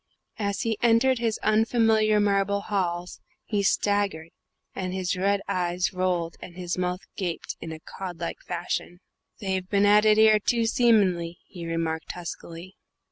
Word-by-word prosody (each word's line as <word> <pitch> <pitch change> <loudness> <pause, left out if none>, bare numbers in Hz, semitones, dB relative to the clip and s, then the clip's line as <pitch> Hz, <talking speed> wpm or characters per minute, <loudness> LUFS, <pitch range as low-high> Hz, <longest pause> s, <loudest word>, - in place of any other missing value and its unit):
As 200 -1 -1
he 225 -2 -1
entered 240 +2 +4
his 230 -2 0
unfamiliar 220 -1 +3
marble 200 0 +1
halls 180 -3 -2 0.3
he 205 -2 0
staggered, 200 -5 +1 0.4
and 185 -1 -4
his 185 -1 -1
red 200 +2 +1
eyes 180 0 -1
rolled 180 -2 -1
and 175 - -10
his 180 -1 -3
mouth 180 +1 -2
gaped 180 -4 -4
in 165 - -6
a 160 - -7
cod 180 +1 -8
like 170 - -4
fashion. 175 0 -4 0.4
"They've 190 -2 -2
been 200 0 +3
at 210 +1 +5
it 215 0 +5
'ere, 220 -1 +6
too, 230 +2 +1
seemin'ly," 195 -8 +2
he 170 -3 -8
remarked 165 -1 -2
huskily. 175 +1 -8
190 Hz, 150 wpm, -26 LUFS, 175-210 Hz, 0.4 s, ere